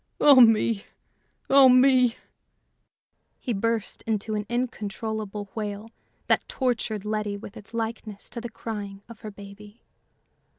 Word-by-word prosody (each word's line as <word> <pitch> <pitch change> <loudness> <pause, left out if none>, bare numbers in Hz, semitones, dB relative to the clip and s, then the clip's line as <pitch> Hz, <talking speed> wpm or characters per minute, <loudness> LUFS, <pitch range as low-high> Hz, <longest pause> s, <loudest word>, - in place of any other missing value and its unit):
Oh 280 -3 +8
me! 225 -2 +4 0.6
oh 270 -1 +7
me!" 255 -1 +5 1.2
He 245 - -3
burst 225 +1 -2
into 215 0 -1
an 210 -1 -3
incontrollable 215 -3 -4
wail 210 0 -5 0.3
that - - +1
tortured 230 -5 -2
Letty 210 -1 -2
with 200 +1 -11
its 215 -2 -12
likeness 225 -2 -5
to 235 - -5
the 240 - -6
crying 205 -3 -7
of 235 -2 -12
her 215 - -7
baby. 205 +2 -13
220 Hz, 125 wpm, -25 LUFS, 205-235 Hz, 1.2 s, Oh